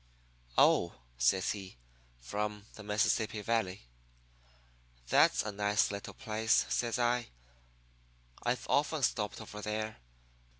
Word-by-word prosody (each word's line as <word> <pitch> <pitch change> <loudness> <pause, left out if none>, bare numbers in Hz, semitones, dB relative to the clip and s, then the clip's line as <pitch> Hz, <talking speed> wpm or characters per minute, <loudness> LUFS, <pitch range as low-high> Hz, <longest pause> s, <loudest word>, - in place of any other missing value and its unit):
"'Oh,' 85 - +4 0.2
says 60 +10 +2
he, 95 -8 -7 0.4
'from 105 +9 -4
the - - -10
Mississippi 105 +1 0
Valley.' 100 - -1 1.3
"'That's - - +5
a 105 - -3
nice 105 +1 +1
little 100 0 -6
place,' 110 -2 +1
says 120 0 0
I. 120 0 +1 1.2
'I've 125 +1 -1
often 150 0 +1
stopped 105 -4 0
over 105 -1 -8
there. 110 +1 -3
105 Hz, 110 wpm, -32 LUFS, 100-115 Hz, 1.3 s, That's